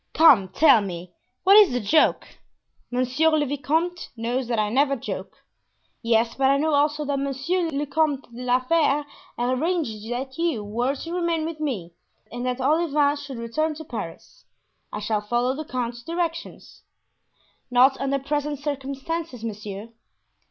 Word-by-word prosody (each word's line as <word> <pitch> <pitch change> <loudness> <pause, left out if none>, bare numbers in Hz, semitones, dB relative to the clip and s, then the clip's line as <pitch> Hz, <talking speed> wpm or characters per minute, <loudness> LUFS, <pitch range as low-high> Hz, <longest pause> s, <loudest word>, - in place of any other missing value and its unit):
"Come, 265 -12 +7
tell 265 - +5
me, 180 -2 -6 0.3
what 390 +2 +7
is 410 -11 +7
the 245 - +1
joke?" 300 +9 +2 0.6
"Monsieur 255 +6 +2
le 310 -2 +2
vicomte 310 +6 -1
knows 240 +2 -2
that 235 -1 -1
I 210 -1 +1
never 275 +3 +3
joke." 245 - -6 0.6
"Yes, 230 0 +2
but 270 0 +2
I 275 - +4
know 310 +2 +1
also 295 +1 +2
that 280 -1 -1
Monsieur 280 +6 -1
le 290 -1 -2
Comte 290 -1 0
de 240 - -8
la 250 0 +2
Fere 295 +1 +2 0.3
arranged 255 - -1
that 265 +4 -4
you 325 -11 0
were 240 +7 -1
to 330 +5 -7
remain 340 -3 0
with 325 -1 -5
me 215 - -3 0.4
and 245 +1 -5
that 250 0 -1
Olivain 295 0 +2
should 285 -3 -8
return 300 +7 -1
to 315 +1 -9
Paris. 205 - -8 0.5
I - - -4
shall 210 0 -1
follow 240 +4 0
the 310 +2 -5
count's 240 -2 -4
directions." 335 +3 -5 0.9
"Not 255 +2 +5
under 275 0 +1
present 290 +1 -2
circumstances, 275 0 -4
monsieur." 210 -1 -6
275 Hz, 155 wpm, -24 LUFS, 240-310 Hz, 0.9 s, Come